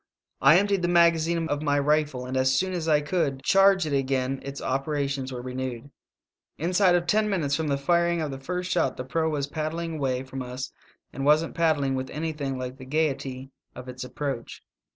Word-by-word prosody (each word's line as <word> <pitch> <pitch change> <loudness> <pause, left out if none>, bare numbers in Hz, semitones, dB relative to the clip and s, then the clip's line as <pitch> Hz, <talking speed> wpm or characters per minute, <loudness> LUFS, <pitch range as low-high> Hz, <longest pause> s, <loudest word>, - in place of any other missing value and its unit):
I 135 +5 +7
emptied 200 -1 +2
the 175 - +1
magazine 170 -1 +3
of 145 -2 -2
my 145 -2 +1
rifle, 145 -3 +1
and 130 +1 -5
as 130 0 +3
soon 185 +4 0
as 170 -3 -3
I 150 -2 +4
could 145 -4 -1
charge 195 -2 +5
it 150 - -3
again 135 -1 0
its 140 0 -7
operations 135 0 -2
were 125 -1 -6
renewed. 130 0 -5 0.7
"Inside 180 +2 +3
of 175 -1 +1
ten 210 +5 +2
minutes 155 -8 0
from 160 0 -2
the 140 -1 +1
firing 170 +4 +2
of 155 -3 -2
the 135 - -6
first 180 +5 -4
shot 175 - +1
the - - -4
proa 160 +5 0
was 145 -3 -1
paddling 160 +2 -4
away 130 -3 -1
from 135 0 -7
us, 125 +1 -6 0.4
and 135 - -4
wasn't 150 +3 +3
paddling 150 -5 +1
with 130 0 -3
anything 150 -3 -3
like 130 0 -5
the 130 - -10
gayety 135 -2 -2 0.2
of 125 - -9
its 125 0 -6
approach. 130 -1 -5
145 Hz, 195 wpm, -26 LUFS, 130-165 Hz, 0.7 s, I